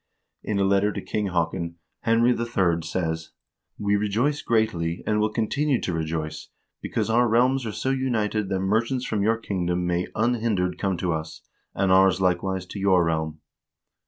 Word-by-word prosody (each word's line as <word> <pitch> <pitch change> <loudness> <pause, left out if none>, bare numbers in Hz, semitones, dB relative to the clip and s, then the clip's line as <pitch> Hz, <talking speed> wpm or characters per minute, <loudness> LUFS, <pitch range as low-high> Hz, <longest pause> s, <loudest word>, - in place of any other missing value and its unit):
In 105 - -2
a 100 - +2
letter 100 +1 +3
to - - -4
King 105 -1 -2
Haakon, 85 -1 -1 0.2
Henry 115 +2 +3
III. 100 -8 +1
says: 80 -1 -3 0.2
" - - -59
We 100 0 +1
rejoice 110 +9 0
greatly, 90 -7 0
and 105 0 +1
will 105 0 +2
continue 125 +5 0
to 90 - -3
rejoice, 80 -1 -3 0.3
because - - -1
our 120 +2 +4
realms 125 +2 +2
are - - -2
so 130 +5 -2
united 110 -6 0
that 95 -1 -1
merchants 115 +6 0
from 105 -2 -1
your 110 +3 +2
kingdom 90 -5 -2
may 90 0 0
unhindered 110 -6 0
come 95 -3 0
to 85 0 -1
us, 80 0 -5 0.3
and 95 -1 +1
ours 95 0 +5
likewise 95 0 0
to 100 - -8
your 95 -3 +4
realm." 80 -1 -2
100 Hz, 170 wpm, -25 LUFS, 90-115 Hz, 0.3 s, ours